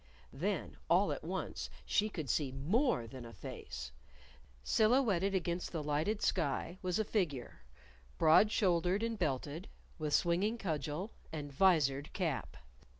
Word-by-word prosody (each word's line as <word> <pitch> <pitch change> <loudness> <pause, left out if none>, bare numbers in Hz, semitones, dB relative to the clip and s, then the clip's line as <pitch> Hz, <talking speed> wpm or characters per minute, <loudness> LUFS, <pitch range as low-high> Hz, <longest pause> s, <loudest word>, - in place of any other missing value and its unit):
Then, - - -2
all - - +4
at - - -4
once, - - -4 0.2
she 215 0 +2
could 160 -8 -5
see 135 +2 0
more 165 - +1
than 125 +2 -9
a 115 0 -10
face! 65 - -7 0.7
Silhouetted 215 -5 +3
against 175 -1 -1
the 160 -3 -3
lighted 155 +9 0
sky 170 +2 0
was 180 -1 0
a 220 - +2
figure 160 - -2 0.6
broad 165 - +6
shouldered 185 -1 +2
and 230 -2 -2
belted, 150 +2 -2 0.3
with 150 -1 +1
swinging 190 +7 +2
cudgel, 160 - -3 0.2
and 145 -3 -5
visored 145 -4 +3
cap. 165 -8 -2
170 Hz, 135 wpm, -34 LUFS, 145-200 Hz, 0.7 s, broad